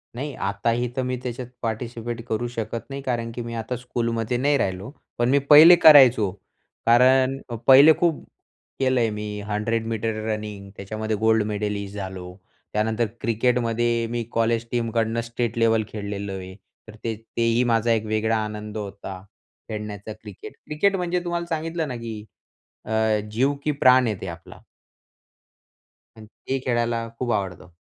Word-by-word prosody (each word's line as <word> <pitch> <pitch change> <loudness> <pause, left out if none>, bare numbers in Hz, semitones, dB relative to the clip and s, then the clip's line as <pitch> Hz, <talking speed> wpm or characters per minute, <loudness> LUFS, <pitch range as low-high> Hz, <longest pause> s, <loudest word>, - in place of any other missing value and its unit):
नाही 140 +3 -4
आताही 115 +5 -1
तर 130 - 0
मी 125 0 -2
त्याच्यात 125 0 -5
पार्टिसिपेट 115 +1 -4
करू 115 +2 -1
शकत 115 -1 -5
नाही. 140 0 -5
कारण, 120 -3 -2
की 120 - -4
मी 115 0 -6
आता 115 +2 -3
स्कूलमध्ये 115 -1 -2
नाही 145 +3 +2
राहिलो. 95 -1 -2 0.3
पण 120 +1 +1
मी 140 +2 +4
पहिले 160 +4 +10
करायचो. 130 - +7 0.5
कारण 130 +3 +4 0.3
पहिले 140 +4 +9
खूप 170 -3 +1 0.6
केलंय 130 -3 +2
मी. 105 0 -5 0.2
100 110 +2 -1
मीटर 115 0 -2
रनिंग 105 -2 -5
त्याच्यामध्ये 110 +2 -3
गोल्ड 110 -1 +4
मेडलिस्ट 100 -1 -3
झालो. 95 -2 -7 0.4
त्यानंतर 110 +2 +1 0.2
क्रिकेटमध्ये 115 0 +1
मी 120 0 -2
कॉलेज 115 0 +1
टीमकडनं 115 -1 0
स्टेट 115 0 -3
लेवल 115 -1 +3
खेळलेलो 100 -2 -5
आहे. 95 0 -8 0.3
तर 110 - -11
ते 115 -1 -2 0.2
तेही 115 +1 +2
माझा 115 -1 +2
एक 110 -1 +1
वेगळा 110 +1 0
आनंद 105 0 -6
होता 100 -2 -7 0.5
खेळण्याचा 105 -1 -6
क्रिकेट. 105 -2 -11
क्रिकेट 175 +7 +1
म्हणजे 180 -1 -1
तुम्हाला 175 -1 -2
सांगितलं 160 0 -3
ना, 125 - -5
की 115 -3 -6 0.6
अ, - - -10 0.4
जीव 130 +6 +2
की 150 - +1
प्राण 130 -3 +5
आहे 110 - -1
ते - - -5
आपला. 85 -1 -10 1.6
आणि 110 - -11
ते 135 +5 -5
खेळायला 120 -1 0
खूप 125 -2 -1
आवडतं. 90 -2 -4
115 Hz, 150 wpm, -23 LUFS, 105-125 Hz, 1.6 s, पहिले